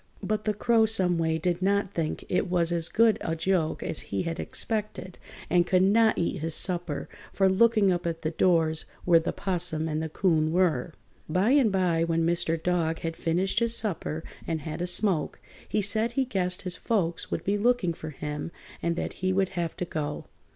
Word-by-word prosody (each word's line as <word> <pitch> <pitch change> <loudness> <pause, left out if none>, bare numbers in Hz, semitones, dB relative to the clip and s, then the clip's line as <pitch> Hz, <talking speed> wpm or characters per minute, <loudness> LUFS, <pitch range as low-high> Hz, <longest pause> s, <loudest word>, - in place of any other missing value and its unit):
But 215 0 -2
the 215 -1 0
Crow 225 +1 +3
some 185 -6 +2
way 160 -1 +1
did 175 +2 -1
not 200 0 +1
think 160 -2 -3
it 180 - 0
was 175 -1 +2
as 170 -1 +2
good 225 -1 +3
a 165 - -2
joke 165 -1 0
as - - -3
he 100 - -1
had 165 0 -4
expected 210 -5 -3 0.3
and 175 -1 +2
could 185 0 +3
not 220 +3 +4
eat 175 +2 -1
his 160 0 0
supper 175 -5 0 0.2
for 195 - +2
looking 210 0 +4
up 175 -1 -1
at 165 -1 -4
the 155 - -1
doors 160 -2 +2 0.2
where 170 -2 +6
the 165 - -2
'Possum 175 -4 -1
and 155 0 -2
the 160 - -3
'Coon 155 -2 +1
were. 170 -4 +1 0.3
By 185 +8 +2
and 270 -6 +4
by, 180 -4 +1
when 165 0 0
Mr. 165 -1 0
Dog 165 -2 0
had 165 0 -3
finished 175 +4 0
his 235 0 +2
supper 165 -6 -2 0.2
and 160 -2 -2
had 155 +3 -5
a 175 - -1
smoke, 180 -3 0 0.3
he 210 - 0
said 220 +4 +2
he 270 +1 +1
guessed 185 -6 -2
his 180 -2 -3
folks 175 -7 -1
would - - -3
be 205 +1 0
looking 230 -6 +2
for 160 -1 -8
him 150 +2 -5 0.3
and 170 0 0
that - - -3
he 185 0 +1
would 190 0 +1
have 170 -3 -4
to 180 - -2
go. 150 -3 -4
175 Hz, 200 wpm, -27 LUFS, 165-195 Hz, 0.3 s, where